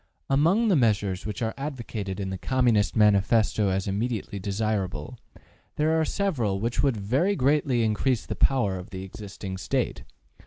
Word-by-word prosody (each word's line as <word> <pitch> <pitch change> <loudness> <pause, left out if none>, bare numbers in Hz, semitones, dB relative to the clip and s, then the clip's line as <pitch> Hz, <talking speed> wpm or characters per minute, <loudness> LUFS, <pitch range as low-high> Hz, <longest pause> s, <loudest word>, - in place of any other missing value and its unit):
Among 170 +12 +3
the 190 - +4
measures 105 - +1
which 105 +2 -4
are 110 - -1
advocated 115 -9 -5
in 95 -1 -3
the 95 - -3
Communist 120 -5 +2
Manifesto 105 0 +3
as 95 0 -1
immediately 105 0 -2
desirable, 100 -5 -2 0.6
there 155 +1 +1
are - - +1
several 130 - -1
which 115 +4 -1
would 135 -5 +1
very 135 - +1
greatly 135 -4 +2
increase 110 +3 0
the - - -4
power 110 -9 +2
of 90 - -10
the 95 0 -6
existing 95 -1 -7
State. - - -2
110 Hz, 155 wpm, -26 LUFS, 100-130 Hz, 0.6 s, the